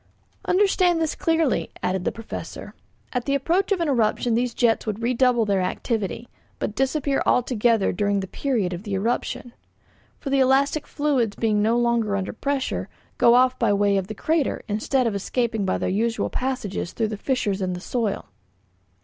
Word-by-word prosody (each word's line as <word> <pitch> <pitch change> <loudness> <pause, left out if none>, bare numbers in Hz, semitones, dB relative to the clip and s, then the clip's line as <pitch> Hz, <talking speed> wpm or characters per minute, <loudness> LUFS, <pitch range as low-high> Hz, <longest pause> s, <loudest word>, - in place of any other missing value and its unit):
"Understand 365 -3 +3
this 320 -2 0
clearly," 325 -6 +1
added 185 0 -1
the - - +1
Professor. 225 -1 -8 0.4
"At 250 -2 -1
the 280 - +1
approach 345 +9 +1
of 390 - +2
an 335 - +1
eruption 240 -2 +1
these 240 +1 0
jets 230 -2 +2
would 215 +2 -3
redouble 245 -1 +3
their 200 -2 +1
activity, 215 +4 -2 0.3
but - - -3
disappear 275 +2 0
altogether 230 -3 +2
during 200 +1 0
the 190 - -4
period 215 -5 -1
of 175 - -5
the 205 -2 -3
eruption. 235 +3 -2 0.6
For 275 - -5
the 275 - +3
elastic 270 +3 +2
fluids, 265 -8 0
being 215 -2 +1
no 225 +3 +2
longer 235 -4 +1
under 190 -1 -3
pressure, 265 - -2 0.3
go 235 - +6
off 255 +1 +3
by 225 -4 +3
way 200 0 +2
of 190 -1 0
the 215 - -6
crater 315 +5 0
instead 235 +5 0
of 230 - 0
escaping 220 +1 -1
by 185 - 0
their - - -2
usual 225 +4 0
passages 215 -9 -3
through 220 -2 -1
the 215 - -3
fissures 210 -4 -1
in 185 -1 -1
the 180 - -5
soil. 220 +1 -2
235 Hz, 175 wpm, -24 LUFS, 205-265 Hz, 0.6 s, go